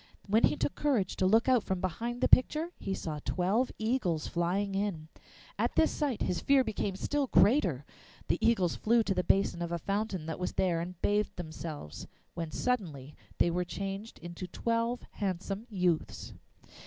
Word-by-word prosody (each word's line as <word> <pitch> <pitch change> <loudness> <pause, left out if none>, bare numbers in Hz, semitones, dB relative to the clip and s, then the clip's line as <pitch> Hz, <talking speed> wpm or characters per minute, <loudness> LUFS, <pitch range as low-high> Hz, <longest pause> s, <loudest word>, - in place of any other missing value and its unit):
When 215 +3 +4
he - - +1
took - - -1
courage 255 -11 0
to 185 - +3
look 225 +5 +4
out 255 -3 +5
from 190 -1 -2
behind 230 +7 -3
the - - +4
picture, 310 +6 +4
he 195 - -2
saw 155 -4 -4
twelve 200 +8 +1
eagles 220 - 0
flying 185 +4 0
in. 195 -6 -2 0.5
At - - 0
this 320 - +4
sight 285 -7 -1
his 175 - 0
fear 275 -1 +4
became 205 -4 -2
still 285 +7 -1
greater. 190 - +3 0.4
The - - +1
eagles 190 -7 +2
flew 230 +1 +3
to 200 - 0
the 180 - 0
basin 190 -1 +2
of 170 0 -3
a 170 - 0
fountain 200 -2 -2
that 160 +2 -4
was 180 - -2
there 175 -3 +1
and 175 0 -7
bathed 210 +1 +1
themselves, 155 - -7 0.3
when 165 -2 -4
suddenly 155 - -2 0.2
they 170 - +3
were 180 +1 0
changed 195 +4 -5
into 175 +2 -7
twelve 230 +5 -1
handsome 195 +3 -3
youths. 180 -6 -1
195 Hz, 175 wpm, -31 LUFS, 175-230 Hz, 0.5 s, out